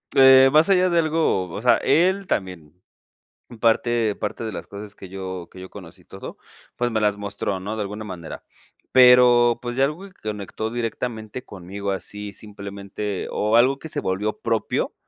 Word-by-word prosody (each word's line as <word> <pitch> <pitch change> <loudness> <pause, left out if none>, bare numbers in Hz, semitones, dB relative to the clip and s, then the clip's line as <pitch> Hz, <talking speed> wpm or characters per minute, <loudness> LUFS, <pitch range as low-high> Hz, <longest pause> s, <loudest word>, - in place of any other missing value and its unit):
Eh, 135 0 +8
más 155 +3 +5
allá 185 -1 +4
de 170 - +1
algo, 155 - +1
o - - -6
sea, 125 - +5
él 190 +4 +2
también. 90 - -4 0.9
Parte 115 -1 +2
parte 105 +2 -4
de 110 - -4
las - - -7
cosas 100 0 -9
que 95 - -11
yo 95 -2 -7
que - - -14
yo 95 - -10
conocí 90 -5 -12
y - - -26
todo, - - -10 0.4
pues 120 0 -1
me 110 - 0
las 105 -1 +1
mostró, 100 -1 -4
¿no?, 105 +3 -5
de - - -2
alguna 105 +1 -5
manera. 90 -6 -8 0.5
Pero, 125 -2 +6
pues 120 0 -5
ya 135 - +4
algo 155 +6 -4
que - - -23
conectó 105 +1 -5
directamente 115 0 -4
conmigo 100 +1 -6
así 105 +1 -5
simplemente 100 -1 -6
o 105 +2 0
algo 130 +4 +4
que 160 - -8
se - - -4
volvió 100 +3 -2
propio 115 -2 -1
110 Hz, 180 wpm, -22 LUFS, 100-125 Hz, 0.9 s, Eh